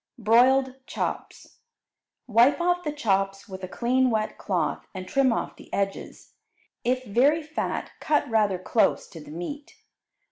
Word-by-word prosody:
Broiled 255 +4 +4
Chops - - -5 0.7
Wipe 240 +6 +4
off 355 +1 +1
the 300 - -2
chops 195 -8 -1
with 190 -2 -9
a - - -3
clean 255 +5 +1
wet 220 -2 -1
cloth 180 -6 -2
and 185 0 -6
trim 270 +1 +3
off - - -3
the - - -15
edges; 195 0 -4 0.5
if 255 +1 0
very 275 +9 +3
fat 310 +1 -3
cut 295 -1 +1
rather 215 -5 +2
close 215 +5 +1
to 170 - -10
the - - -13
meat. 175 - -7
235 Hz, 145 wpm, -26 LUFS, 195-270 Hz, 0.7 s, Broiled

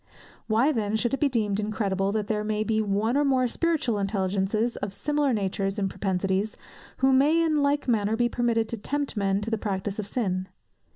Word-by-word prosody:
Why 230 +7 +3
then 215 -5 -1
should 240 +3 0
it 275 - 0
be 290 - +3
deemed 210 -5 0
incredible, 200 -2 -1
that 215 0 -1
there 210 0 -1
may 215 0 -1
be 220 0 +1
one 215 +3 0
or 290 - +3
more 260 -3 +2
spiritual 285 -6 0
intelligences 195 +3 0
of 200 -1 -4
similar 295 -2 0
natures 195 -2 -1
and 195 -2 -1
propensities, 195 +2 -1 0.4
who 265 0 +3
may 290 +5 +4
in 310 -2 +2
like 285 0 +1
manner 220 -2 +2
be 240 +1 +2
permitted 235 -2 0
to 230 - -3
tempt 285 +6 -3
men 200 -1 +1
to 225 +2 -4
the 225 - 0
practice 200 0 -3
of 205 - -3
sin? 190 -5 -2
215 Hz, 195 wpm, -26 LUFS, 200-250 Hz, 0.4 s, may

